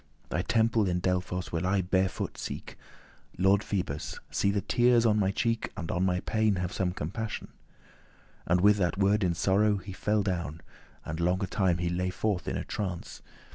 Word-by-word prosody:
Thy - - 0
temple 110 +1 +2
in 90 -1 +1
Delphos 90 0 -1
will 85 +2 -1
I 95 0 +2
barefoot 95 +1 0
seek. - - -6 0.6
Lord 95 +2 +4
Phoebus! 90 -7 -3
see 100 - +1
the 100 0 +1
teares 120 -1 +4
on 105 -2 +4
my 95 -2 +2
cheek 115 +3 -1
And 85 -5 -3
on 90 - 0
my 90 0 0
pain 110 -2 +1
have 90 -1 -3
some 90 -2 0
compassioun." 100 +6 -4 1.0
And 90 +1 +3
with 105 +1 +6
that 95 -1 0
word 100 +1 +3
in 85 -2 +1
sorrow 100 +4 +3
he 95 0 -8
fell 105 +2 +1
down, 85 -5 -3 0.4
And 80 - -4
longe 90 +3 0
time 95 -4 +2
he 85 0 -1
lay 90 +1 0
forth 95 +1 -1
in - - -1
a - - -3
trance. 95 -5 -5
95 Hz, 180 wpm, -29 LUFS, 90-105 Hz, 1.0 s, with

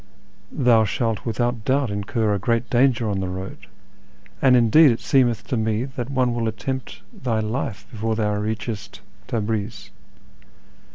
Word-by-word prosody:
Thou 120 -5 +4
shalt 115 +2 -2
without 120 0 -1
doubt 130 -1 +1
incur 105 +2 -1
a 100 - 0
great 115 +4 0
danger 125 -2 +3
on 100 -2 -1
the 95 - -2
road, 95 +1 -7 0.7
and 130 -2 +6
indeed 125 +6 +6
it 115 - 0
seemeth 125 -4 +2
to - - 0
me 110 +1 0
that 130 -2 -6
one 130 -3 +1
will 115 -1 -1
attempt 120 +5 -5
thy 125 - -2
life 110 -2 -3
before 110 0 -2
thou 105 -1 0
reachest 105 -1 -4 0.3
Tabriz. 110 -2 -3
115 Hz, 150 wpm, -23 LUFS, 105-125 Hz, 0.7 s, and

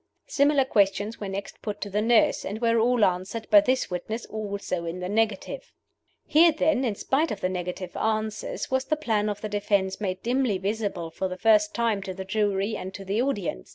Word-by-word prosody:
Similar 285 -1 +3
questions 205 -1 +1
were 200 - -4
next 195 +1 -6
put 210 -2 -4
to 205 - -4
the 210 +2 +1
nurse, 230 +1 +3
and 205 +3 -4
were 230 -1 +2
all 235 -1 +4
answered 185 +5 -2
by 205 -1 +9
this 255 0 0
witness 215 +6 -4
also 200 -5 -4
in 170 +2 -4
the 180 - -3
negative. 215 0 -1 0.5
Here, 330 +3 +6
then, 310 -3 +1
in 225 -5 0
spite 295 +9 0
of 205 - -4
the 185 - 0
negative 180 0 -5
answers, 215 +1 -2
was 260 0 +1
the 310 - +1
plan 220 -8 0
of 205 - -4
the 215 - -4
defense 200 -1 0
made 190 -2 -3
dimly 245 -4 +1
visible 195 -4 -3
for 190 +3 -2
the 185 0 -6
first 210 0 +3
time 230 -4 +1
to 190 -1 -6
the 190 0 -6
jury 205 +1 0
and 190 -1 -6
to 195 - -8
the 200 +4 0
audience. 205 - -2
210 Hz, 205 wpm, -26 LUFS, 190-230 Hz, 0.5 s, by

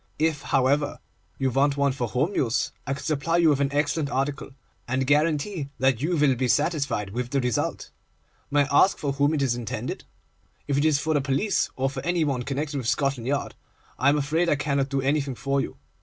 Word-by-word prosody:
If, 155 -2 +1
however, 140 +3 +1 0.4
you 135 -1 0
want 140 +2 +2
one 140 -1 +2
for 125 -2 -2
home 140 - 0
use, 130 -4 0 0.2
I 135 - 0
can 140 - -9
supply 160 +2 0
you 170 -2 +5
with 145 -2 +2
an 140 0 +1
excellent 145 +1 0
article, 140 +1 -2 0.4
and 130 +2 0
guarantee 150 +2 +1
that 130 -2 +2
you 170 +3 0
will 145 -3 +3
he 125 +1 0
satisfied 140 - 0
with 120 +3 -3
the 140 +1 0
result. 125 -3 -2 0.6
May 145 0 +3
I 140 - +4
ask 195 - -4
for 145 - -2
whom 145 +3 +2
it 140 - 0
is 130 -3 +2
intended? 120 -3 -5 0.6
If 140 - 0
it 145 +2 +2
is 155 -2 +4
for 155 +3 -1
the 145 - +2
police, 140 +10 0
or 135 +1 0
for 135 0 -4
any 175 -1 +1
one 140 -4 -1
connected 140 +3 -3
with 125 -4 -3
Scotland 135 -2 0
Yard, 140 +1 -1 0.5
I 135 - +4
am 145 - +3
afraid 160 +4 +1
I - - +3
cannot 140 -1 0
do 135 -1 0
anything 140 -1 0
for 140 +2 0
you. - - -6
140 Hz, 215 wpm, -25 LUFS, 135-150 Hz, 0.6 s, you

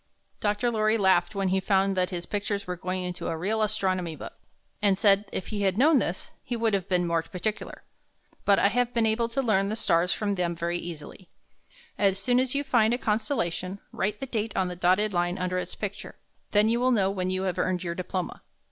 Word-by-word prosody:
Dr. 210 +3 0
Lorry 215 0 +2
laughed 190 -1 +3
when 195 -1 0
he 190 +1 +2
found 195 0 +2
that 185 -1 +1
his 175 -2 -5
pictures 205 -1 -2
were 180 - -3
going 185 +1 -3
into 180 0 -4
a 165 - -2
real 210 +6 -1
Astronomy 185 -5 0
book, - - -8 0.5
and 200 -2 +3
said 200 0 +4
if 185 - -4
he 210 -2 -3
had 195 -1 +1
known 290 +3 +5
this, - - -3
he 245 - -4
would 230 -2 +1
have 195 -1 -1
been 180 -1 +2
more 170 -1 +1
particular. 210 +6 -5 0.6
But 200 -1 +4
I 200 - +4
have 245 +2 0
been 230 -1 +3
able 225 +1 +1
to 270 +3 -1
learn 200 -4 +2
the 215 - -1
stars 180 -5 +2
from 205 -1 -1
them 175 -3 -1
very 170 +1 -2
easily. 170 +2 -9 0.7
As 195 -2 +3
soon 245 +5 +2
as 260 +1 0
you 285 - +1
find 235 -4 +3
a - - -3
constellation, 210 - -1
write 210 +2 -2
the - - -3
date 225 -4 -3
on 185 -1 +1
the 180 - -5
dotted 185 +4 +2
line 175 +1 0
under 185 0 -1
its - - -5
picture. - - -6 0.3
Then 210 +1 +4
you 235 +2 +2
will 255 +1 +3
know 200 -6 +3
when 185 -2 -2
you 185 0 -1
have 185 -2 -2
earned 185 -1 0
your 170 -1 -2
diploma. 185 0 -4
195 Hz, 220 wpm, -27 LUFS, 180-220 Hz, 0.7 s, known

